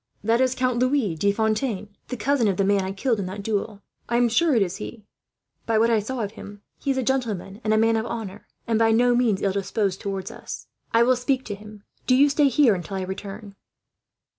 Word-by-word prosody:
"That 230 +3 +2
is 260 0 +2
Count 255 -2 0
Louis 255 - +1
de 200 +6 +1
Fontaine, 215 0 -1 0.2
the 250 - -5
cousin 235 +1 +1
of 195 -3 0
the 195 - +2
man 200 0 +3
I 190 0 -3
killed 225 +3 0
in 190 - -3
that 200 +2 -6
duel. 210 -1 -3 0.3
I 235 - +2
am 240 0 +3
sure 310 +5 +3
it 220 - +4
is 180 0 -4
he. 220 -3 -8 0.6
By 225 -1 +2
what 230 +2 +3
I 225 - +4
saw 240 +4 -4
of 205 - -4
him, 205 -2 -11 0.2
he - - -4
is 270 - +1
a 260 - 0
gentleman 220 -6 -2
and 215 - 0
a 215 - +4
man 225 +1 +3
of 220 +1 -1
honour, 210 -4 -6 0.2
and 225 -1 +1
by 225 0 +4
no 245 +2 +4
means 235 -5 +1
ill 195 - +2
disposed 195 -1 -1
towards 195 -1 -4
us. - - -8 0.3
"I 230 +1 +5
will 255 +2 +4
speak 260 +1 -1
to 205 - -4
him. 210 0 -12 0.2
Do 255 - +5
you 285 +2 +5
stay 285 0 +3
here, 270 -6 +4
till 195 +3 -6
I 190 - -2
return." 200 +2 -7
220 Hz, 240 wpm, -24 LUFS, 200-245 Hz, 0.6 s, I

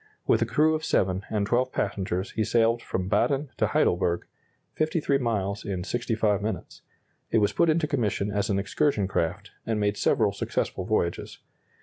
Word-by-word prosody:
With - - +3
a - - +2
crew 155 +1 +3
of 155 0 -2
seven 95 -9 +1
and 105 -2 0
twelve 125 +4 +1
passengers 95 0 -2
he 110 - 0
sailed 115 +1 +2
from 95 -4 -3
Baden 140 +6 +1
to - - +2
Heidelberg 85 0 +1 0.5
53 155 -3 +1
miles 105 -5 -1
in 95 -4 -3
65 110 -2 0
minutes. 105 -2 -5 0.5
It - - +2
was 105 -2 +2
put 170 - +3
into 160 0 +2
commission 110 -7 -1
as 100 -1 -1
an 100 - +1
excursion 105 +1 +1
craft, 85 -4 -2
and 110 -2 -1
made 105 0 0
several 105 -3 +2
successful 95 -1 -2
voyages. 85 -4 -1
105 Hz, 165 wpm, -26 LUFS, 100-125 Hz, 0.5 s, With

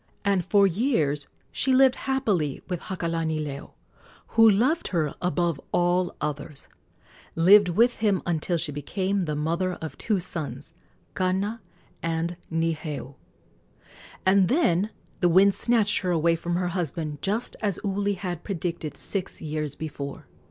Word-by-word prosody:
And 195 -3 +2
for 200 +2 +4
years 165 - +1 0.2
she 265 -1 +3
lived 265 -1 +6
happily 210 - -1
with 180 -2 -3
Hakalanileo, 160 -5 -3 0.6
who 225 -1 +6
loved 250 +11 +2
her 160 -5 0
above 175 -4 0
all 175 +1 +1
others 145 -1 -5 0.7
lived 190 +3 +6
with 235 +8 +3
him 205 -4 +1
until 170 +1 0
she 155 -2 -1
became 185 +7 -1
the 150 -1 -2
mother 170 +5 -1
of 160 -2 -7
two 210 -4 0
sons, 155 -4 -5 0.4
Kana 195 +4 -1 0.4
and 165 +1 -1 0.2
Niheu; 160 -4 -2 1.1
and 190 0 +5
then 210 - +2 0.3
the 175 - +3
winds 190 +3 +5
snatched 215 -1 +2
her 185 - -2
away 165 -1 +3
from 170 +1 -3
her 180 0 0
husband, 160 -4 -3
just 215 +5 -1
as 200 -4 -1
Uli 200 0 0
had 180 -3 -5
predicted 170 -5 -4
six 195 -3 -4
years 150 -2 -4
before. 145 -3 -6
175 Hz, 135 wpm, -26 LUFS, 160-200 Hz, 1.1 s, lived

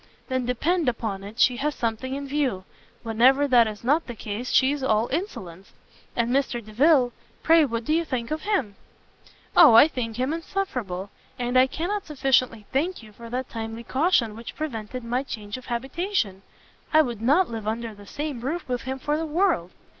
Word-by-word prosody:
"Then 260 -2 -1
depend 305 +5 +1
upon 215 -5 -4
it 210 +4 -10
she 250 -1 +4
has 295 +2 -1
something 235 +3 -2
in 280 0 -5
view: 270 -9 -1 0.4
whenever 255 +5 +4
that 240 -4 +5
is 215 0 -7
not 295 +7 +2
the 240 - -6
case 220 +3 -5
she 265 +1 +4
is 290 -1 -3
all 220 -3 +2
insolence. 190 - -5 0.4
And 235 0 0
Mr 275 +1 +1
Delvile, 250 +3 +3 0.3
pray 325 -1 +6
what 230 -3 -3
do 305 - +1
you 335 +1 +2
think 255 -5 -4
of 310 - -2
him?" 280 - -1 0.8
"O, 310 -10 +8
I 235 - +9
think 235 -7 -4
him 260 +4 0
insufferable! 250 - -4 0.3
and 245 0 -2
I 255 +1 +6
cannot 370 +8 -3
sufficiently 260 -6 +1
thank 320 +2 -1
you 215 - -13
for 230 +2 -11
that 255 +2 -3
timely 225 0 -5
caution 260 - +1
which 230 +1 -9
prevented 250 -5 -5
my 240 +2 -1
change 210 -6 -6
of 255 - -10
habitation. 260 - -2 0.5
I 315 -1 +6
would 240 -6 -5
not 290 +7 +3
live 220 -2 -5
under 225 +1 -3
the 205 -1 -14
same 290 -5 -4
roof 310 +8 -3
with 250 -1 -2
him 265 0 -4
for 295 +3 -1
the 320 +1 -2
world!" 320 - +1
255 Hz, 190 wpm, -25 LUFS, 225-295 Hz, 0.8 s, I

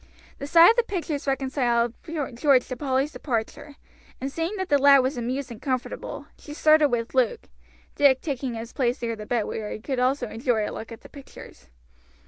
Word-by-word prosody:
The 280 - -5
sight 335 +5 +8
of 460 - -3
the - - +6
pictures 330 -9 -4
reconciled 255 -4 0
George 280 -4 +1
to 255 - -3
Polly's 270 +2 -1
departure, 285 +3 -4 0.4
and 270 +1 -4
seeing 330 +7 -3
the 375 -8 +1
lad 275 -1 +6
was 265 +3 -1
amused 250 +2 -3
and 230 0 -10
comfortable, 260 -2 -4
she 295 - -10
started 310 -1 +4
with 235 -2 -2
Luke, 260 - 0 0.4
Dick 275 -2 +4
taking 265 -5 -4
his 230 +1 -7
place 250 -2 0
near 230 -1 -2
the 210 -1 -9
bed, 240 -3 0
where 215 -1 -5
he - - -5
could 260 +3 -3
also 255 0 +1
enjoy 225 -1 -1
a - - -6
look 225 - -8
at 230 - -10
the - - -14
pictures. 275 - -13
265 Hz, 190 wpm, -25 LUFS, 240-290 Hz, 0.4 s, sight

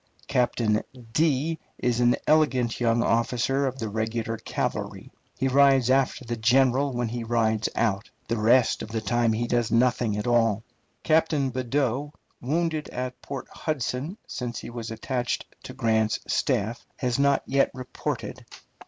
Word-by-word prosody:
Captain 115 -3 +1 1.0
is 120 -1 0
an 120 0 +4
elegant 130 -6 +2
young 115 -1 +2
officer 125 +4 +1
of 130 0 -4
the 115 - -3
regular 110 +1 -2
cavalry. - - -4 0.3
He 135 - +1
rides 135 -2 +5
after 130 -1 +1
the 120 0 -3
general 130 +4 +3
when 120 -2 -2
he 120 +1 -4
rides 110 -1 +1
out; 110 -3 0 0.2
the 115 0 -1
rest 120 +3 +4
of - - -6
the 110 0 -2
time 115 +2 +1
he 115 +2 0
does 120 -1 0
nothing 115 -2 +2
at 105 - -3
all. 115 -3 +2 0.4
Captain 155 -4 +2
Badeau, 130 +2 -1 0.3
wounded 155 +3 -1
at 125 0 -5
Port 135 -2 -6
Hudson 150 - -3
since 120 -2 -5
he - - -7
was 115 -1 -6
attached 120 +2 -2 0.2
to 130 - -7
Grant's 110 -3 +1
staff, 110 +4 0
has 125 -2 -1
not 140 0 +3
yet 135 +1 +2
reported. 130 -1 -5
120 Hz, 145 wpm, -26 LUFS, 115-135 Hz, 1.0 s, rides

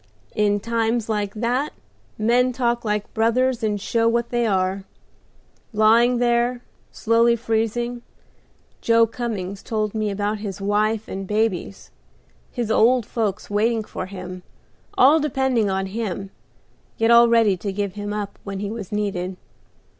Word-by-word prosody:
In 205 -1 +2
times 230 +1 -1
like 205 -2 -1
that 245 +6 -1 0.4
men 245 +4 +2
talk 240 -1 0
like 210 -1 -2
brothers 245 +3 +1
and 210 -2 -1
show 230 +3 +1
what 235 0 0
they 240 -1 0
are. 190 -1 0 0.9
Lying 230 +3 +4
there, 240 0 +1 0.3
slowly 230 +1 +3
freezing, 235 +1 -1 0.8
Joe 230 0 +4
Cummings 210 -5 -5
told 215 -2 -2
me 215 -1 -1
about 205 +1 -2
his 205 -2 -6
wife 210 +2 0
and 195 0 -6
babies, 210 -2 -2 0.6
his 235 -3 -3
old 235 +1 +4
folks 215 -3 -2
waiting 220 +2 +1
for 185 - -6
him, 185 -1 -8 0.6
all 285 +5 +6
depending 265 -7 +1
on 190 0 -1
him, 195 -1 -4 0.7
yet 225 +1 +3
all 235 0 +8
ready 225 -4 +4
to 200 +2 -4
give 200 -1 -3
him 205 0 -5
up 205 -1 -5
when 200 -1 -5
he 200 +1 -4
was 220 -5 -7
needed. 190 -3 -2
220 Hz, 140 wpm, -22 LUFS, 205-235 Hz, 0.9 s, all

